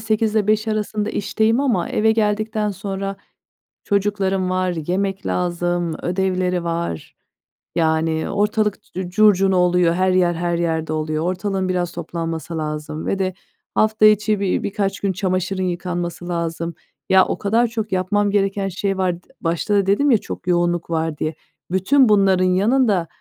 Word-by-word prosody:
08.00-17.00 215 Hz, 0 st, +1 dB
arasında 215 Hz, 0 st, -1 dB
işteyim 220 Hz, +4 st, +1 dB
ama 235 Hz, -11 st, +1 dB
eve 220 Hz, +1 st, +2 dB
geldikten 215 Hz, 0 st, 0 dB
sonra 195 Hz, 0 st, -4 dB, 0.7 s
çocuklarım 195 Hz, -2 st, 0 dB
var, 185 Hz, -1 st, 0 dB
yemek 195 Hz, +2 st, -1 dB
lazım, 175 Hz, -1 st, -1 dB
ödevleri 185 Hz, -1 st, 0 dB
var. 170 Hz, -, -3 dB, 0.6 s
Yani 160 Hz, -1 st, +1 dB
ortalık 210 Hz, +1 st, 0 dB
c 180 Hz, -1 st, -4 dB
curcuna 195 Hz, -1 st, +4 dB
oluyor. 180 Hz, -1 st, +3 dB
Her 185 Hz, +1 st, +2 dB
yer 180 Hz, -1 st, +3 dB
her 170 Hz, 0 st, -1 dB
yerde 160 Hz, -2 st, -1 dB
oluyor. 155 Hz, 0 st, -2 dB
Ortalığın 185 Hz, +1 st, -1 dB
biraz 180 Hz, -1 st, -1 dB
toplanması 165 Hz, -1 st, -5 dB
lazım 155 Hz, 0 st, -4 dB
ve 195 Hz, -, -1 dB
de 185 Hz, -1 st, 0 dB, 0.4 s
hafta 215 Hz, 0 st, +3 dB
içi 215 Hz, 0 st, +4 dB
bi 195 Hz, -2 st, 0 dB
bir -, -, 0 dB
birkaç 195 Hz, -1 st, -2 dB
gün 200 Hz, -, 0 dB
çamaşırın 185 Hz, 0 st, -1 dB
yıkanması 175 Hz, -1 st, -3 dB
lazım. 170 Hz, -1 st, -3 dB, 0.4 s
Ya, 190 Hz, 0 st, +6 dB
o -, -, -2 dB
kadar 225 Hz, +4 st, +2 dB
çok 220 Hz, -2 st, -4 dB
yapmam 200 Hz, +2 st, +1 dB
gereken 195 Hz, -1 st, 0 dB
şey 195 Hz, +1 st, -2 dB
var. 180 Hz, -2 st, -1 dB
D -, -, -31 dB
başta 170 Hz, +5 st, -1 dB
da 200 Hz, -1 st, +3 dB
dedim 235 Hz, +9 st, +3 dB
ya 230 Hz, -, +6 dB
çok 185 Hz, -, -8 dB
yoğunluk 175 Hz, -1 st, +1 dB
var 160 Hz, -2 st, -1 dB
diye. 155 Hz, +2 st, -2 dB, 0.4 s
Bütün 230 Hz, +7 st, +4 dB
bunların 195 Hz, -3 st, +4 dB
yanında, 200 Hz, 0 st, +2 dB
185 Hz, 150 wpm, -20 LUFS, 175-205 Hz, 0.7 s, Ya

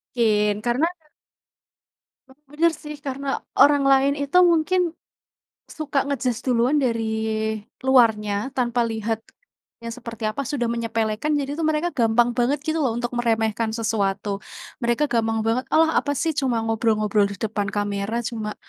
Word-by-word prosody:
Kin, 210 Hz, -3 st, +2 dB
karena 245 Hz, +7 st, +1 dB, 1.4 s
Oh, 265 Hz, -, -20 dB
bener 330 Hz, +3 st, +3 dB
sih 300 Hz, 0 st, -7 dB
karena 275 Hz, +1 st, -4 dB, 0.3 s
orang 285 Hz, -1 st, +6 dB
lain 270 Hz, +1 st, +4 dB
itu 285 Hz, +6 st, +2 dB
mungkin, 335 Hz, +3 st, +2 dB, 0.9 s
suka 295 Hz, -3 st, -2 dB
nge-judge 255 Hz, -4 st, -1 dB
duluan 250 Hz, +4 st, +3 dB
dari 230 Hz, -4 st, 0 dB, 0.8 s
luarnya, 225 Hz, -6 st, +4 dB, 0.2 s
tanpa 240 Hz, -2 st, +1 dB
lihat 220 Hz, 0 st, -2 dB, 0.6 s
yang 230 Hz, -, -5 dB
seperti 230 Hz, -2 st, -9 dB
apa 215 Hz, +6 st, -1 dB
sudah 265 Hz, -3 st, -1 dB
menyepelekan 230 Hz, +4 st, -1 dB
jadi 280 Hz, 0 st, -3 dB
tuh 320 Hz, -, +1 dB
mereka 315 Hz, +2 st, +1 dB
gampang 235 Hz, -2 st, +3 dB
banget 255 Hz, +4 st, +1 dB
gitu 315 Hz, +1 st, 0 dB
loh 240 Hz, -4 st, 0 dB
untuk 240 Hz, 0 st, -3 dB
meremehkan 225 Hz, -2 st, 0 dB
sesuatu. 200 Hz, -3 st, -1 dB, 0.4 s
Mereka 240 Hz, +5 st, +2 dB
gampang 225 Hz, -1 st, +1 dB
banget, 230 Hz, +3 st, 0 dB
"Alah 320 Hz, 0 st, +5 dB
apa 285 Hz, -, -3 dB
sih 325 Hz, +4 st, 0 dB
cuma 245 Hz, -5 st, 0 dB
ngobrol-ngobrol 215 Hz, -2 st, +1 dB
di 200 Hz, -, -6 dB
depan 210 Hz, 0 st, -2 dB
kamera, 205 Hz, +3 st, -2 dB
cuma, 220 Hz, -2 st, -4 dB
235 Hz, 140 wpm, -23 LUFS, 220-275 Hz, 1.4 s, orang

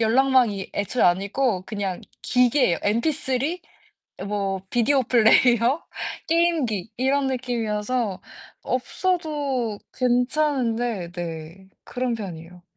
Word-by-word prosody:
연락망이 235 Hz, -3 st, +3 dB
애초에 205 Hz, +4 st, -1 dB
아니고 195 Hz, +4 st, +2 dB
그냥 200 Hz, -4 st, -3 dB, 0.2 s
기계예요. 250 Hz, -6 st, +3 dB
MP3 265 Hz, -, 0 dB, 0.7 s
뭐 195 Hz, -2 st, -2 dB
비디오 255 Hz, +3 st, +3 dB
플레이어, 240 Hz, +3 st, +4 dB, 0.5 s
게임기 315 Hz, -, +1 dB
이런 270 Hz, +2 st, +2 dB
느낌이어서 235 Hz, -4 st, -2 dB, 0.4 s
없어도 280 Hz, -, -1 dB, 0.2 s
괜찮은데 245 Hz, -, 0 dB
네. 170 Hz, +1 st, -7 dB, 0.2 s
그런 250 Hz, -1 st, -2 dB
편이에요. 175 Hz, -4 st, -8 dB
240 Hz, 235 characters per minute, -24 LUFS, 200-265 Hz, 0.7 s, 플레이어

